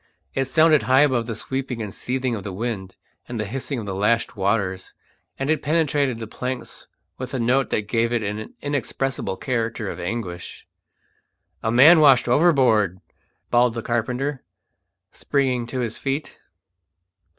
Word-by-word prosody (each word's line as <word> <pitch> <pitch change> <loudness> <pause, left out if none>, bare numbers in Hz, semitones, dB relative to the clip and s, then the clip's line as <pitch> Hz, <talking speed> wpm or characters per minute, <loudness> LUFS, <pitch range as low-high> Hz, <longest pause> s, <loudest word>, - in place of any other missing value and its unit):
It 135 - 0
sounded 155 +2 +4
high 130 +4 +4
above 130 -6 +2
the 115 - -3
sweeping 130 +1 -4
and 105 -3 -5
seething 130 -1 -2
of 105 -4 -4
the 100 - -5
wind 100 -2 -4 0.3
and 120 -2 -5
the 110 - -1
hissing 135 +5 -4
of 110 - -5
the 100 - -4
lashed 115 +5 +1
waters, 95 -2 -1 0.4
and 135 +3 -1
it 155 - +1
penetrated 145 -5 +1
the 115 - -6
planks 125 +3 -6 0.3
with 130 +1 -5
a - - -1
note 125 +3 +2
that 105 -1 -1
gave 115 +1 +1
it 120 -2 0
an 105 +1 -5
inexpressible 135 -6 -2
character 115 -4 -2
of - - -8
anguish. 90 -2 -5 1.0
"A 110 - 0
man 145 +8 +8
washed 135 -5 +6
overboard!" 120 - +3 0.5
bawled 120 -1 +3
the 115 - -4
carpenter, 125 +4 -2 0.7
springing 130 -4 0
to 130 +1 -3
his 115 -2 -3
feet. 140 +2 -3
120 Hz, 155 wpm, -23 LUFS, 110-135 Hz, 1.0 s, man